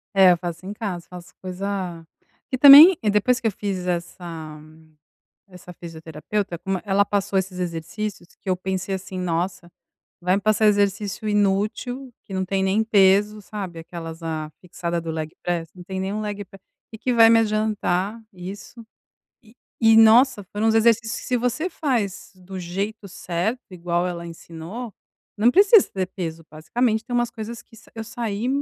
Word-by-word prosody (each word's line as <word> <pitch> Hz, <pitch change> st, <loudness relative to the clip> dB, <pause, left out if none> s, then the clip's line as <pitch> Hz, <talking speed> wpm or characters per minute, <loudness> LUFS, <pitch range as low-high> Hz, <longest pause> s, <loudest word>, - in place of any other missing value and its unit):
É, 190 Hz, -2 st, +7 dB
eu 175 Hz, -, +3 dB
faço 170 Hz, 0 st, -6 dB
em 200 Hz, -, -5 dB
casa, 195 Hz, -6 st, -5 dB
faço 180 Hz, -1 st, -11 dB
coisa 185 Hz, -2 st, -4 dB, 0.5 s
que -, -, +1 dB
também, 290 Hz, +7 st, +11 dB, 0.2 s
depois 240 Hz, +5 st, +2 dB
que 235 Hz, -, -1 dB
eu -, -, +1 dB
fiz 190 Hz, -2 st, -4 dB
essa 170 Hz, -3 st, -5 dB, 0.9 s
essa 180 Hz, -1 st, -12 dB
fisioterapeuta, 170 Hz, +3 st, -5 dB
como 190 Hz, +3 st, -2 dB
e -, -, -17 dB
ela 200 Hz, 0 st, +3 dB
passou 200 Hz, -1 st, -1 dB
esses 185 Hz, -1 st, -2 dB
exercícios, 175 Hz, +2 st, -5 dB
que 195 Hz, -, -6 dB
eu 185 Hz, -, +2 dB
pensei 190 Hz, +1 st, -3 dB
assim: 190 Hz, 0 st, -7 dB
"Nossa, 175 Hz, 0 st, -2 dB, 0.5 s
vai 180 Hz, +1 st, +2 dB
me -, -, -4 dB
passar 215 Hz, +1 st, +2 dB
exercício 205 Hz, 0 st, 0 dB
inútil, 210 Hz, +6 st, -1 dB
que 195 Hz, -, -11 dB
não 190 Hz, 0 st, -1 dB
tem 190 Hz, +1 st, -1 dB
nem 195 Hz, +3 st, +2 dB
peso", 210 Hz, 0 st, +3 dB
sabe, 195 Hz, -5 st, -7 dB
aquelas, 165 Hz, 0 st, -8 dB
"ah, 155 Hz, -1 st, -4 dB
fixada 170 Hz, -1 st, -4 dB
do 165 Hz, 0 st, -5 dB
leg 160 Hz, -1 st, -4 dB
press. 170 Hz, -2 st, -2 dB
Não 180 Hz, -, -11 dB
tem 190 Hz, +1 st, -5 dB
nem 190 Hz, +2 st, -3 dB
um 215 Hz, -, -3 dB
leg 205 Hz, -1 st, -5 dB
p 195 Hz, -, -15 dB, 0.3 s
que 220 Hz, -, -9 dB
que 250 Hz, +3 st, -1 dB
vai 225 Hz, -1 st, +7 dB
me 230 Hz, -, +6 dB
adiantar 215 Hz, -1 st, -1 dB
isso". 195 Hz, +6 st, -9 dB, 0.6 s
E 220 Hz, -, -20 dB, 0.3 s
e 225 Hz, -1 st, +6 dB
nossa, 225 Hz, 0 st, +6 dB
foram 205 Hz, +4 st, -2 dB
os 220 Hz, -, +3 dB
exercícios 225 Hz, 0 st, +2 dB
que -, -, -10 dB
se 250 Hz, -, +1 dB
você 250 Hz, +9 st, -1 dB
faz 240 Hz, -, -2 dB
do 185 Hz, 0 st, -9 dB
jeito 200 Hz, +5 st, -4 dB
certo, 185 Hz, +7 st, -3 dB
igual 175 Hz, 0 st, -1 dB
ela 170 Hz, -1 st, -5 dB
ensinou, 170 Hz, +8 st, -8 dB, 0.4 s
não 225 Hz, +4 st, +4 dB
precisa 400 Hz, -, +6 dB
ter 190 Hz, -2 st, -2 dB
peso, 165 Hz, -4 st, -6 dB
basicamente 220 Hz, +9 st, -1 dB
tem 245 Hz, 0 st, -3 dB
umas 240 Hz, -1 st, +1 dB
coisas 230 Hz, +1 st, -7 dB
que 225 Hz, -, -19 dB
sa -, -, -18 dB
eu 225 Hz, -, -5 dB
saí 225 Hz, -1 st, -4 dB
195 Hz, 175 wpm, -23 LUFS, 175-220 Hz, 0.9 s, também